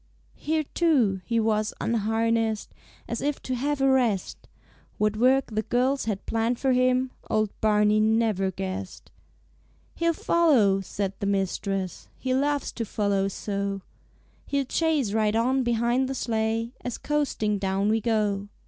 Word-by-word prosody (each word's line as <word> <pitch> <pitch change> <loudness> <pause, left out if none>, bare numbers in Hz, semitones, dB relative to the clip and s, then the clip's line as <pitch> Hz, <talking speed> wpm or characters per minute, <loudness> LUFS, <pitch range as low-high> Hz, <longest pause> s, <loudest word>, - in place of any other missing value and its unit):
Here, 315 0 0
too, 265 - +1
he 230 -1 +1
was 215 -1 0
unharnessed, 225 0 0 0.3
As 235 - -3
if 290 0 -1
to 260 - -3
have 275 +3 -1
a 270 - +4
rest; 245 -8 +1 0.5
What 210 0 +1
work 255 +1 +2
the 215 - +1
girls 255 +4 0
had 210 -3 -3
planned 230 +2 0
for 265 +1 +1
him 255 0 +2 0.2
Old 215 -1 +1
Barney 210 0 +3
never 215 -3 +2
guessed. 190 +1 -6 0.8
"He'll 335 0 +1
follow," 260 - +3
said 195 0 -3
his 200 - -1
mistress, 195 -1 -2
"He 260 -1 -2
loves 285 +2 0
to 235 - -4
follow 200 -2 0
so. 200 0 -3 0.6
He'll 280 -1 0
chase 295 -6 0
right 215 -1 +1
on 255 +4 +2
behind 240 +2 +1
the 270 - -3
sleigh, 225 -1 -1
As 245 -2 -4
coasting 265 -9 -1
down 195 +1 0
we 220 +1 +2
go. 210 -3 0
225 Hz, 145 wpm, -26 LUFS, 205-260 Hz, 0.8 s, a